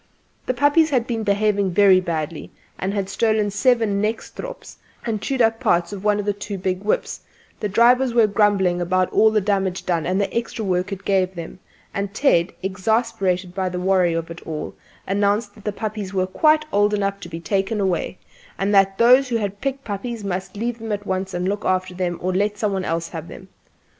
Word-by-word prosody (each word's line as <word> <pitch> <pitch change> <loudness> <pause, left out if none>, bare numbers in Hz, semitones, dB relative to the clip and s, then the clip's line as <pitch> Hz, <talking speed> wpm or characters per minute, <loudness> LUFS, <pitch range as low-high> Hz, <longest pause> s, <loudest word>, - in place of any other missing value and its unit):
The 255 - 0
puppies 290 +5 +4
had 255 -5 +1
been 235 -2 -2
behaving 200 -2 +1
very 195 0 +6
badly, 160 -3 -4 0.3
and 190 - -1
had 200 -2 -2
stolen 215 0 +1
several 230 0 +2
nekstrops 220 - -4 0.3
and 220 -3 -2
chewed 265 -1 +1
up 225 0 +2
parts 175 +3 +1
of 195 -1 -7
one 210 0 +2
or 205 - +2
two 200 0 -6
big 185 +1 -2
whips; 210 - -1 0.4
the 210 - -2
drivers 245 +5 +4
were 230 -1 +5
grumbling 200 -4 +2
about 185 +1 0
all 220 - +5
the 215 0 +2
damage 195 -2 -1
done 170 -3 0
and 185 +2 +1
the 200 - -2
extra 230 -1 -2
work 180 +1 0
it 195 0 -6
gave 190 -1 +1
them; 170 +2 -8 0.3
and 200 0 -3
Ted, 190 -10 +3
exasperated 195 -2 0
by 190 -1 -1
the 180 0 -4
worry 180 -2 +2
of 165 0 -3
it 170 - -9
all, 155 -2 -5 0.3
announced 205 +2 0
that 210 - -17
the 210 - 0
puppies 205 -2 -5
were 185 -1 +2
quite 305 +10 +3
old 205 +1 +3
enough 200 -1 -1
to 170 - -9
be 165 0 -6
taken 195 +5 -1
away, 185 -2 -1 0.4
and 200 +1 0
that 195 -1 +4
those 250 +3 +5
who 240 - -1
had 205 -2 -2
picked 275 0 -2
puppies 220 +2 -5
must 190 +1 -4
take 235 +3 -3
them 225 -1 -5
at 205 0 -3
once 190 0 -2
and 180 0 -2
look 205 +2 -2
after 185 0 0
them, 180 -1 -2
or 185 +1 0
let 205 +2 0
some 205 -1 0
one 190 -1 -1
else 165 -1 -2
have 165 -1 -7
them. 190 - -11
200 Hz, 205 wpm, -22 LUFS, 185-220 Hz, 0.4 s, very